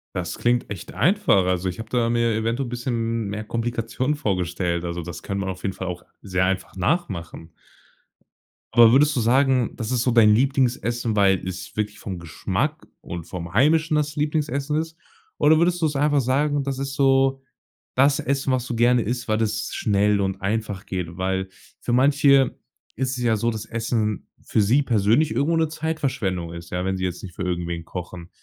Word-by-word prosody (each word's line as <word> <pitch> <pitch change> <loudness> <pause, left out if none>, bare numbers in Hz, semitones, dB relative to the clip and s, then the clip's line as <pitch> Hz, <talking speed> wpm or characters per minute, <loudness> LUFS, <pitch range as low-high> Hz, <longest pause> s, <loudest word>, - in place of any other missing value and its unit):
Das 90 -2 -3
klingt 120 0 +1
echt 100 -4 -7
einfach. 150 - +3
Also, 90 0 0
ich 90 - -3
habe 110 0 -7
da 115 -1 +1
mir 115 -1 +2
eventuell 115 +3 -1
bisschen 115 -2 -2
mehr 105 +2 -4
Komplikationen 115 +4 -2
vorgestellt. 90 - -1
Also, 85 0 -3
das 85 0 -8
kann 100 -1 -3
man 95 -1 -2
auf 95 0 -7
jeden 95 - -1
Fall 95 - -6
auch 90 -1 -6 0.2
sehr 95 -2 0
einfach 95 0 -2
nachmachen. 90 - -2 1.2
Aber 115 -1 +7
würdest 145 +4 +4
du - - +1
sagen, 130 +1 +3
das 110 -2 -4
ist 125 -2 +1
so 125 - +2
dein 110 -3 +6
Lieblingsessen, 120 -3 +1
weil 95 -3 +3
es 90 -1 -7
wirklich 105 -1 -2
vom 95 -3 -6
Geschmack 85 -2 -3 0.2
und 85 -1 -7
vom 85 -1 -7
heimischen 155 - +3
das 150 -1 0
Lieblingsessen 150 -1 -1
ist? 160 +1 -3 0.4
Oder 155 +1 +5
würdest 175 +1 +2
du 160 - +3
es 150 - -1
einfach 145 0 +2
sagen, 145 +3 +1
das 135 -1 -3
ist 135 0 -3
so 135 -1 +3 0.5
das 140 +3 +4
Essen, 140 -2 -1
was 125 -1 0
du 120 - -3
gerne 120 +1 +4
isst, 120 +3 -3
weil 110 0 +1
es 110 -1 -2
schnell 100 0 +2
und 95 0 -2
einfach 100 -1 -2
geht? 85 -3 -5
Weil 95 0 -1 0.3
für - - -3
manche 140 0 +4 0.4
ist 130 -1 -2
es 125 - -3
ja 115 -2 +3
so, 115 +3 0
dass 110 -1 -5
Essen 115 -2 -2 0.2
für 110 - +1
sie 120 +8 +3
persönlich 115 +6 +2
irgendwo 160 +4 +1
'ne 160 0 +2
Zeitverschwendung 130 - -2
ist, 85 0 -9
ja, 90 0 -2
wenn 95 0 -1
sie 95 - -4
jetzt 90 -1 -3
nicht 90 -3 -9
für - - -4
irgendwen 85 -2 -3
kochen. 90 -1 -7
115 Hz, 190 wpm, -23 LUFS, 95-135 Hz, 1.2 s, Aber